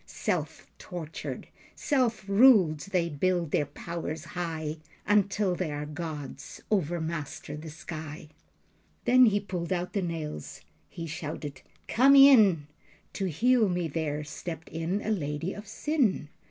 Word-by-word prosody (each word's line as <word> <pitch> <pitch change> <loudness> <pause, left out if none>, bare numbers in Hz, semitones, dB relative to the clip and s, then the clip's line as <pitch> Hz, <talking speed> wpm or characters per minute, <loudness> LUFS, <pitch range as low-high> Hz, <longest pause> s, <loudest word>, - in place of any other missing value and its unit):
Self - - -3
tortured, 165 -4 -6 0.3
self 240 -8 0
ruled, 200 - +6
they 180 0 -1
build 170 +1 0
their 145 - +1
powers 160 +1 -5
high, 160 -3 -3 0.3
Until 200 -1 +2
they 175 -3 -2
are 145 0 -4
gods, 150 -3 -7
overmaster 165 -5 -2
the 155 +1 -8
sky." 155 -1 -8 0.8
Then 255 0 +7
he 205 -1 +3
pulled 185 -3 -5
out 180 0 -1
the 200 - 0
nails. 160 - -5 0.3
He 165 - -6
shouted 150 -3 -6 0.3
"Come 270 +4 +5
in." 220 - +7 0.5
To 195 - -2
heal 225 - +3
me 175 -2 -1
there 150 -1 -2
stepped 160 +2 -7
in 165 +5 -2
a 220 - -1
lady 160 -1 -2
of 210 0 -9
sin. 230 - 0
170 Hz, 130 wpm, -28 LUFS, 155-200 Hz, 0.8 s, Then